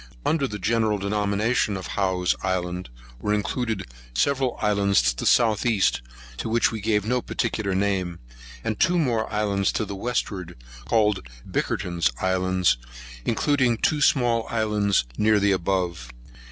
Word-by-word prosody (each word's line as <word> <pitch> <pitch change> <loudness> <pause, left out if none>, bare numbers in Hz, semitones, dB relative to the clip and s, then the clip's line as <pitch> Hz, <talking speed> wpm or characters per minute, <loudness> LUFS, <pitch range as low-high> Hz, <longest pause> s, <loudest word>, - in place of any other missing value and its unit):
Under 150 -4 +1
the 105 - -5
general 110 +1 +1
denomination 105 +2 0
of 95 - -7
Howe's 95 -2 0
Islands, 90 -1 -2 0.3
were 105 +9 0
included 110 +3 -2 0.3
several 135 -3 +1
islands 100 -1 +2
to - - +2
the - - -4
south 110 -4 +4
east, 110 - +2 0.4
to 115 - -4
which 115 +1 +2
we 110 -2 -5
gave 105 -1 +1
no 125 +2 +1
particular 110 -6 -2
name, 95 -3 0 0.5
and 110 - -2
two 175 +1 +3
more 120 -9 0
islands 100 -2 +1
to 110 - -1
the 100 - -6
westward, 95 -5 -3 0.3
called 105 - +1 0.2
Bickerton's 85 -2 0
Islands, 95 -4 +1 0.5
including 130 -1 +2
two 150 +6 +1
small 120 -5 +3
islands 105 - +1
near 105 0 +4
the 100 0 +3
above. 90 -8 -1
105 Hz, 140 wpm, -24 LUFS, 95-115 Hz, 0.5 s, south